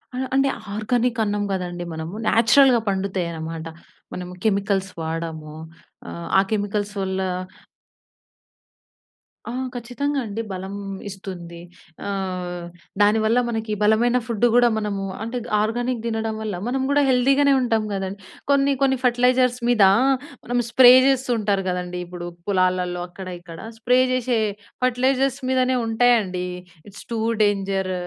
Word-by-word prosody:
ఆ! - - -4 0.2
అంటే 270 +1 +3 0.3
ఆర్గానికన్నాం 220 -1 0
కదండీ 175 -2 -3
మనము 160 +2 -6
న్యాచురల్‌గా 240 +3 +5
పండుతాయన్నమాట. 170 -4 -3 0.5
మనము 180 0 -6
కెమికల్స్ 200 -2 0
వాడము. 160 -1 -5 0.5
ఆహ్, 170 - -7
ఆ - - +6
కెమికల్స్ 205 -1 -1
వల్ల 190 0 -2 2.3
ఆ! - - -4 0.2
ఖచ్చితంగా 270 +4 -2
అండి. 215 +1 -4
బలం 190 +1 -5 0.3
ఇస్తుంది. 180 -3 -8 0.5
ఆహ్, 180 -3 -4 0.4
దానివల్ల 220 +3 +4
మనకి 225 -1 -3
బలమైన 230 +4 +3
ఫుడ్ 235 -1 0
గూడా 245 0 +6
మనము 205 -2 -2 0.2
అంటే 230 +3 -4 0.2
ఆర్గానిక్ 240 +2 -1
తినడం 225 -1 -2
వల్ల 215 -3 -3
మనం 265 +2 -1
గూడా 285 0 +3
హెల్తీ 255 +1 +4
గానే 280 -1 +5
ఉంటాం 225 -3 +1
కదండీ! 195 0 -4 0.3
కొన్ని 280 0 +3
కొన్ని 265 -1 +3
ఫెర్టిలైజర్స్ 250 0 +3
మీద, 230 -4 +4 0.6
మనం 245 +1 -1
స్ప్రే 245 +1 +8 0.2
చేస్తూ 265 -2 +1
ఉంటారు 200 -2 0
కదండీ! 180 0 -3
ఇప్పుడు 175 0 -7 0.2
పొలాలలో 185 -2 +1
అక్కడ, 185 +1 -9
ఇక్కడ 170 -2 -11 0.2
స్ప్రే 250 +3 +3
జేసే 255 -1 +1 0.5
ఫెర్టిలైజర్స్ 260 +2 +1
మీదనే 255 0 +2
ఉంటాయండి. 220 -6 +2 0.4
It's 200 - -12
two 225 - -1 0.2
danger 195 -2 0
215 Hz, 120 wpm, -22 LUFS, 185-245 Hz, 2.3 s, స్ప్రే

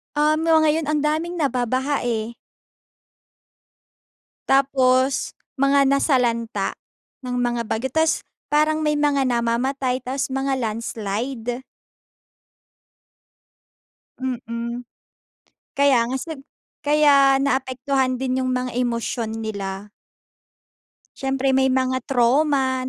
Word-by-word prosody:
Um, 310 +2 +2
'no 320 -1 +5
ngayon 315 0 +2
ang 300 0 0
daming 315 +3 -1
nababaha, 260 +1 0
eh. 230 -1 -2 2.1
Tapos 265 -1 +2 0.2
mga 275 0 +3
nasalanta 245 -4 +1 0.5
ng 250 -1 -3
mga 240 -1 0
bagyo, 225 +3 -2
tas 320 +1 +2 0.3
parang 310 +1 +2
may 300 -1 +1
mga 285 -2 +2
namamatay, 250 +2 0
tapos 265 +2 -2
mga 270 0 -1
landslide. 230 +2 -3 2.6
Mm. 240 -1 -4 0.9
Kaya 275 -4 +4
nga 260 - -2
sig 315 0 -7 0.5
kaya 285 -2 +5
naapektuhan 265 -1 0
din 260 0 -1
yung 255 - -1
mga 250 0 -2
emosyon 230 -2 -2
nila. 200 -2 -5 1.3
Siyempre 270 0 0
may 265 0 +3
mga 260 0 0
trauma 265 +1 +2
260 Hz, 95 wpm, -22 LUFS, 240-280 Hz, 2.6 s, no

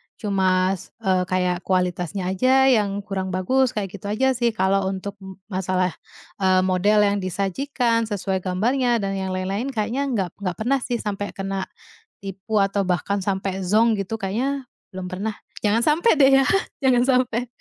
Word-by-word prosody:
cuma, 190 -3 +1
s 185 - -12 0.2
eee, 185 -2 +1
kayak 180 -1 0
kualitasnya 180 0 -1
aja 265 +6 +4
yang 205 -4 +1
kurang 195 -2 -3
bagus, 235 +8 +1
kayak 200 -3 -3
gitu 200 0 -8
aja 260 +6 +2
sih. 240 -3 0
Kalau 190 0 +1
untuk 195 +1 -5
m 190 -1 -10 0.2
masalah, 185 -1 0 0.5
eee, 185 -1 +3
model 200 +3 +3
yang 205 0 +2
disajikan, 230 - -1
sesuai 195 -2 -2
gambarnya 230 +6 0
dan 195 0 -2
yang 190 -1 -3
lain-lain, 195 +6 -2
kayaknya 250 +2 -1
nggak 205 -9 -1
nggak 185 -3 -3
pernah 250 +8 0
sih 245 -1 -3
sampai 205 -3 -4
kena 195 -1 -3 0.6
tipu 195 +3 -5
atau 195 0 0
bahkan 185 +3 0
sampai 190 0 -2
zonk, 220 +2 +3
gitu, 195 +3 -3
kayaknya 255 +8 -1 0.3
belum 185 -1 -5
pernah, 195 +4 -3 0.3
jangan 210 +2 +3
sampai 320 +9 +4
deh 270 -1 +7
ya, - - -2 0.4
jangan 250 -2 +4 0.2
sampai. 245 0 -3
200 Hz, 165 wpm, -23 LUFS, 185-230 Hz, 0.6 s, deh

